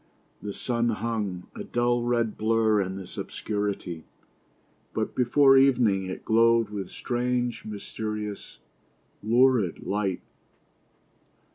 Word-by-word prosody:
The 105 Hz, -, -5 dB
sun 120 Hz, +2 st, -1 dB
hung, 105 Hz, -5 st, -3 dB
a -, -, -6 dB
dull 120 Hz, 0 st, +1 dB
red 120 Hz, -2 st, 0 dB
blur 110 Hz, -1 st, +2 dB
in 95 Hz, 0 st, -3 dB
this 95 Hz, -2 st, -8 dB
obscurity; 100 Hz, -6 st, -4 dB, 0.9 s
but -, -, -1 dB
before 135 Hz, +2 st, +5 dB
evening 120 Hz, -8 st, +3 dB
it 95 Hz, -, -7 dB
glowed 115 Hz, -1 st, +3 dB
with 100 Hz, -2 st, -5 dB
strange, 125 Hz, 0 st, -2 dB
mysterious, 105 Hz, 0 st, -6 dB, 0.6 s
lurid 115 Hz, -4 st, +2 dB
light. 100 Hz, -3 st, -1 dB
110 Hz, 105 wpm, -26 LUFS, 100-120 Hz, 0.9 s, before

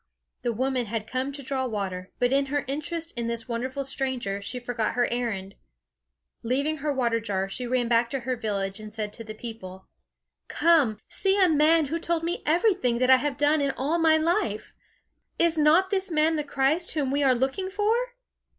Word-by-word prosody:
The 240 Hz, -, 0 dB
woman 255 Hz, +1 st, -1 dB
had 220 Hz, 0 st, -3 dB
come 255 Hz, +4 st, -2 dB
to 280 Hz, 0 st, -7 dB
draw 260 Hz, 0 st, -2 dB
water, 190 Hz, -5 st, -4 dB
but 245 Hz, +1 st, +1 dB
in 275 Hz, 0 st, +2 dB
her 290 Hz, +1 st, -1 dB
interest 320 Hz, +4 st, -3 dB
in 235 Hz, -1 st, -2 dB
this 235 Hz, 0 st, -3 dB
wonderful 255 Hz, +4 st, -3 dB
stranger, 255 Hz, -7 st, -1 dB
she 225 Hz, +5 st, -4 dB
forgot 240 Hz, -3 st, -2 dB
her 245 Hz, 0 st, +3 dB
errand. 210 Hz, -6 st, -3 dB, 0.9 s
Leaving 280 Hz, +6 st, 0 dB
her 295 Hz, +1 st, -2 dB
water 240 Hz, -4 st, +1 dB
jar, 195 Hz, -4 st, -2 dB
she 245 Hz, +6 st, -4 dB
ran 245 Hz, -1 st, +1 dB
back 235 Hz, 0 st, +2 dB
to 270 Hz, +1 st, -3 dB
her 255 Hz, +1 st, -2 dB
village, 200 Hz, -3 st, -3 dB
and 215 Hz, 0 st, -9 dB
said 210 Hz, -1 st, -4 dB
to 230 Hz, -, -8 dB
the 215 Hz, -1 st, -8 dB
people: 190 Hz, -5 st, -9 dB, 0.6 s
"Come, 305 Hz, -11 st, +3 dB
see 390 Hz, +1 st, +1 dB
a 375 Hz, -, +6 dB
man 315 Hz, 0 st, +4 dB
who 320 Hz, +4 st, -3 dB
told 335 Hz, 0 st, -1 dB
me 340 Hz, +2 st, -2 dB
everything 335 Hz, -, +2 dB
that 255 Hz, +1 st, +3 dB
I 260 Hz, -, +9 dB
have 275 Hz, +1 st, -2 dB
done 295 Hz, +1 st, +3 dB
in 280 Hz, -, +1 dB
all 300 Hz, +6 st, 0 dB
my 320 Hz, -1 st, +5 dB
life! 310 Hz, -, -1 dB, 0.6 s
Is 335 Hz, -1 st, +3 dB
not 320 Hz, +5 st, +4 dB
this 385 Hz, -1 st, 0 dB
man 320 Hz, 0 st, +2 dB
the 300 Hz, -, -1 dB
Christ 285 Hz, +5 st, 0 dB
whom 280 Hz, -4 st, 0 dB
we 285 Hz, +1 st, +1 dB
are 265 Hz, -2 st, +4 dB
looking 270 Hz, +10 st, -1 dB
for?" 415 Hz, +2 st, +1 dB
260 Hz, 195 wpm, -26 LUFS, 230-310 Hz, 0.9 s, I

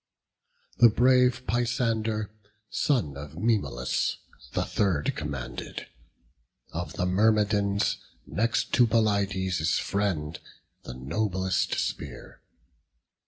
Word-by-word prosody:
The 120 Hz, -, +9 dB
brave 125 Hz, +2 st, +3 dB
Peisander, 115 Hz, -3 st, 0 dB, 0.4 s
son 115 Hz, -, +1 dB
of 70 Hz, +2 st, -8 dB
Maemalus, 100 Hz, -, 0 dB, 0.4 s
The -, -, 0 dB
third 90 Hz, -8 st, 0 dB
commanded; 70 Hz, -5 st, -5 dB, 0.9 s
of 85 Hz, -2 st, -4 dB
the 90 Hz, -, -1 dB
Myrmidons, 100 Hz, +1 st, +2 dB, 0.3 s
Next 115 Hz, +3 st, 0 dB
to 120 Hz, -2 st, +5 dB
Pelides' 100 Hz, -6 st, +1 dB
friend, 85 Hz, -7 st, -1 dB, 0.4 s
the 65 Hz, -, -8 dB
noblest 95 Hz, +7 st, -1 dB
spear. 70 Hz, -4 st, -5 dB
100 Hz, 85 wpm, -27 LUFS, 80-115 Hz, 0.9 s, The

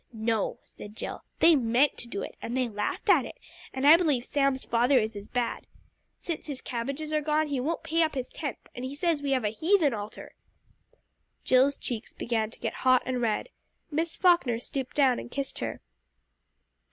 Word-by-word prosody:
"No," 220 Hz, -1 st, -1 dB
said 210 Hz, +1 st, -12 dB
Jill, -, -, -6 dB, 0.2 s
"they 330 Hz, -1 st, +7 dB
meant 255 Hz, +2 st, +3 dB
to 240 Hz, -, -4 dB
do 200 Hz, -4 st, -4 dB
it, -, -, -7 dB
and 240 Hz, +2 st, -3 dB
they 255 Hz, -1 st, +1 dB
laughed 210 Hz, -2 st, -3 dB
at -, -, +6 dB
it, -, -, -8 dB, 0.4 s
and 265 Hz, +1 st, -2 dB
I 310 Hz, +3 st, +9 dB
believe 295 Hz, -8 st, +1 dB
Sam's 275 Hz, -2 st, +1 dB
father 245 Hz, +4 st, +3 dB
is 220 Hz, -2 st, 0 dB
as 205 Hz, 0 st, -8 dB
bad. 245 Hz, -2 st, -2 dB, 0.5 s
Since 335 Hz, -2 st, -5 dB
his 280 Hz, -3 st, -5 dB
cabbages 275 Hz, +6 st, -4 dB
are 305 Hz, -, +2 dB
gone, 305 Hz, 0 st, +1 dB
he 280 Hz, -2 st, -1 dB
won't 315 Hz, +6 st, -2 dB
pay 330 Hz, +1 st, +1 dB
up 315 Hz, -2 st, +1 dB
his 255 Hz, -2 st, -3 dB
tenth, 290 Hz, -5 st, -6 dB
and 245 Hz, -, -7 dB
he 260 Hz, +2 st, -5 dB
says 320 Hz, -1 st, 0 dB
we 285 Hz, -, -2 dB
have 255 Hz, -3 st, +1 dB
a 210 Hz, -, +1 dB
heathen 315 Hz, -, +2 dB
altar!" 210 Hz, 0 st, -7 dB, 1.1 s
Jill's 260 Hz, +2 st, +4 dB
cheeks 235 Hz, -3 st, -5 dB
began 225 Hz, -2 st, -1 dB
to -, -, -14 dB
get 225 Hz, -, -3 dB
hot 255 Hz, -1 st, +4 dB
and 255 Hz, -1 st, -1 dB
red. 225 Hz, -, 0 dB, 0.4 s
Miss 320 Hz, +2 st, -1 dB
Falkner 340 Hz, -11 st, +3 dB
stooped 255 Hz, +1 st, -5 dB
down 265 Hz, -4 st, +4 dB
and -, -, -8 dB
kissed 275 Hz, +2 st, -4 dB
her. -, -, -4 dB
260 Hz, 195 wpm, -28 LUFS, 235-300 Hz, 1.1 s, I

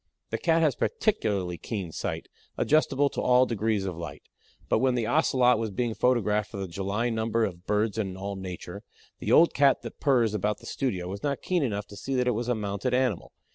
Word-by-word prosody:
The -, -, -1 dB
Cat 165 Hz, -1 st, +3 dB
has 150 Hz, -4 st, +3 dB
particularly 100 Hz, -, -1 dB
keen 100 Hz, -7 st, -4 dB
sight, -, -, -4 dB, 0.3 s
adjustable 145 Hz, -2 st, +3 dB
to -, -, -3 dB
all 125 Hz, 0 st, +5 dB
degrees 110 Hz, -3 st, -1 dB
of 95 Hz, -3 st, -3 dB
light. 85 Hz, 0 st, -8 dB, 0.4 s
But -, -, +2 dB
when 130 Hz, -1 st, +2 dB
the 120 Hz, -2 st, 0 dB
Ocelot 125 Hz, -2 st, +3 dB
was 115 Hz, -1 st, -2 dB
being 115 Hz, +3 st, -1 dB
photographed 105 Hz, -2 st, +1 dB
for 100 Hz, -, -8 dB
the 95 Hz, -1 st, -3 dB
July 100 Hz, +6 st, -2 dB
number 110 Hz, 0 st, +1 dB
of 90 Hz, -3 st, -7 dB
BIRDS 105 Hz, +1 st, +1 dB
AND 95 Hz, -3 st, -3 dB
ALL 100 Hz, +1 st, -4 dB
NATURE 95 Hz, -2 st, -7 dB, 0.4 s
the -, -, -2 dB
old 170 Hz, -, +6 dB
Cat 140 Hz, -1 st, +3 dB
that -, -, -8 dB
purrs 120 Hz, -7 st, +3 dB
about 105 Hz, 0 st, 0 dB
the -, -, -16 dB
studio 95 Hz, -10 st, -2 dB
was 100 Hz, +2 st, -6 dB
not 140 Hz, -2 st, -2 dB
keen 180 Hz, -2 st, +1 dB
enough 105 Hz, -6 st, -1 dB
to 100 Hz, -, -12 dB
see 135 Hz, +6 st, -4 dB
that 125 Hz, -1 st, +1 dB
it -, -, +4 dB
was 120 Hz, +1 st, -2 dB
a 125 Hz, -, +2 dB
mounted 105 Hz, +4 st, -2 dB
animal. 125 Hz, -8 st, 0 dB
110 Hz, 215 wpm, -27 LUFS, 100-125 Hz, 0.4 s, old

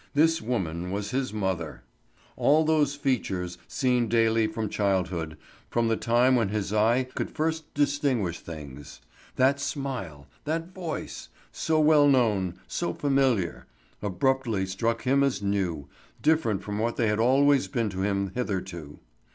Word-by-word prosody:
This 160 Hz, +2 st, +3 dB
woman 90 Hz, -7 st, -2 dB
was 100 Hz, +2 st, -3 dB
his 130 Hz, 0 st, -1 dB
mother! 95 Hz, -6 st, -3 dB, 0.5 s
All 155 Hz, +3 st, +4 dB
those 150 Hz, -3 st, +2 dB
features, 95 Hz, -11 st, -2 dB
seen 125 Hz, -3 st, +1 dB
daily 115 Hz, 0 st, +3 dB
from 110 Hz, 0 st, -3 dB
childhood, 90 Hz, -6 st, -1 dB, 0.3 s
from 115 Hz, -1 st, +1 dB
the 115 Hz, -, +2 dB
time 120 Hz, +3 st, +3 dB
when 115 Hz, -5 st, +1 dB
his 105 Hz, -1 st, -2 dB
eye 115 Hz, +4 st, +3 dB
could -, -, -3 dB
first 160 Hz, 0 st, -2 dB
distinguish 140 Hz, -, 0 dB
things, 75 Hz, -5 st, -10 dB, 0.3 s
that 135 Hz, +2 st, +3 dB
smile, 130 Hz, -, -4 dB, 0.2 s
that 165 Hz, +4 st, -3 dB
voice—so 160 Hz, -2 st, -4 dB
well 150 Hz, -1 st, +5 dB
known, 105 Hz, -10 st, +2 dB
so 175 Hz, -, -2 dB
familiar—abruptly 120 Hz, -, -1 dB
struck 115 Hz, +5 st, -1 dB
him 135 Hz, +2 st, +3 dB
as 135 Hz, -6 st, +1 dB
new, 90 Hz, -8 st, -1 dB, 0.3 s
different 155 Hz, -11 st, +1 dB
from 105 Hz, 0 st, -4 dB
what 115 Hz, +2 st, 0 dB
they 115 Hz, -, +1 dB
had 105 Hz, 0 st, +1 dB
always 135 Hz, +3 st, +4 dB
been 115 Hz, -6 st, -1 dB
to 95 Hz, 0 st, -4 dB
him 100 Hz, -1 st, 0 dB
hitherto. 95 Hz, -10 st, -4 dB
115 Hz, 135 wpm, -27 LUFS, 95-140 Hz, 0.5 s, well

